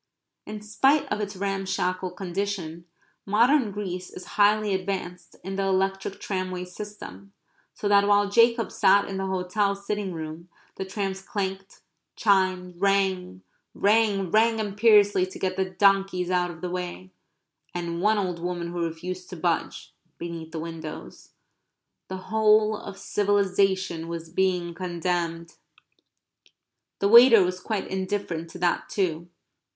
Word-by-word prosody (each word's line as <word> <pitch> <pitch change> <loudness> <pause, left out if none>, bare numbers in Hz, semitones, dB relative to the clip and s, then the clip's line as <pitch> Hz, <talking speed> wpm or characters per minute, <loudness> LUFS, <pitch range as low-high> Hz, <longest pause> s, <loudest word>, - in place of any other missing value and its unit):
In 210 0 -7
spite 270 +8 +2
of 210 0 -1
its 205 -1 -4
ramshackle 190 -1 -2
condition 180 -3 -4 0.4
modern 235 +5 +3
Greece 185 -3 -5
is 180 - -10
highly 210 0 +3
advanced 185 -2 -4
in 190 +1 -5
the 195 - 0
electric 195 0 -1
tramway 185 -2 -3
system, 200 +1 -10 0.4
so 205 - -3
that 200 0 +4
while 205 0 +4
Jacob 230 +2 +3
sat 200 +1 +4
in 195 - -4
the 190 0 -2
hotel 190 +2 0
sitting 200 0 -4
room 160 +1 -7 0.3
the 190 - -4
trams 190 -1 -3
clanked, 195 -1 -5 0.3
chimed, 185 -3 +1
rang, 190 - +1 0.3
rang, 205 -3 +2
rang 225 +1 +4
imperiously 205 -2 +4
to 185 - -10
get 185 -1 -2
the 190 0 0
donkeys 195 -1 +2
out 180 -1 +1
of 160 -2 -10
the 180 -1 -4
way, 180 +1 -5 0.6
and 170 -1 -3
one 215 +2 +3
old 180 -4 -2
woman 175 0 -3
who 175 -1 -2
refused 180 +3 -5
to 185 - -7
budge, 170 -1 -2 0.2
beneath 165 -1 -7
the 165 - -6
windows. 160 -1 -8 0.7
The 190 - -5 0.2
whole 215 0 +4
of 200 -1 -8
civilization 195 -5 +1
was 165 -1 -6
being 180 -1 0
condemned. 170 -1 -3 1.4
The 200 - +1
waiter 235 -1 +8
was 180 0 -2
quite 205 +1 -3
indifferent 190 -4 -3
to 175 - -10
that 175 -1 0
too. 170 -3 -2
190 Hz, 135 wpm, -25 LUFS, 180-205 Hz, 1.4 s, waiter